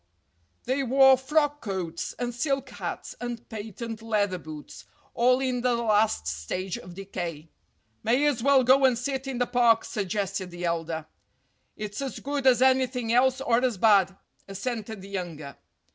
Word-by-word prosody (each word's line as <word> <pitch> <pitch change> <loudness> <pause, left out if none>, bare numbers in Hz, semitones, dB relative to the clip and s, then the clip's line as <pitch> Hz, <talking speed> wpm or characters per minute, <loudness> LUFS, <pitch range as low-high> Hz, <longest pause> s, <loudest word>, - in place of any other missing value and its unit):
They 260 +3 0
wore 265 +1 +6
frock 290 +2 0
coats 180 -5 -4
and 245 -1 -3
silk 270 +1 -1
hats - - -6
and 240 -1 -5
patent 220 +1 -6
leather 205 -5 0
boots, 150 -10 -10 0.3
all 250 +2 +3
in 255 -2 -1
the 245 -1 +2
last 215 - +2
stage 80 - -3
of 180 -1 -10
decay. 175 -5 -6 0.5
"May 250 +6 +2
as 285 -6 +1
well 275 0 +5
go 260 +2 +5
and 255 -3 +4
sit 270 +1 -3
in 265 -2 -3
the 245 - +1
park," 240 -2 +3
suggested 195 -2 -3
the 175 0 -6
elder. 165 -2 -2 0.7
"It's 210 +2 -5
as 270 -2 -4
good 280 -1 -2
as 255 0 +5
anything 255 -3 +2
else 260 +2 +3
or 240 -1 +2
as 245 -5 +1
bad," 195 -2 +4 0.3
assented 215 0 -5
the 195 - -10
younger. 170 -7 -6
230 Hz, 160 wpm, -26 LUFS, 190-260 Hz, 0.7 s, wore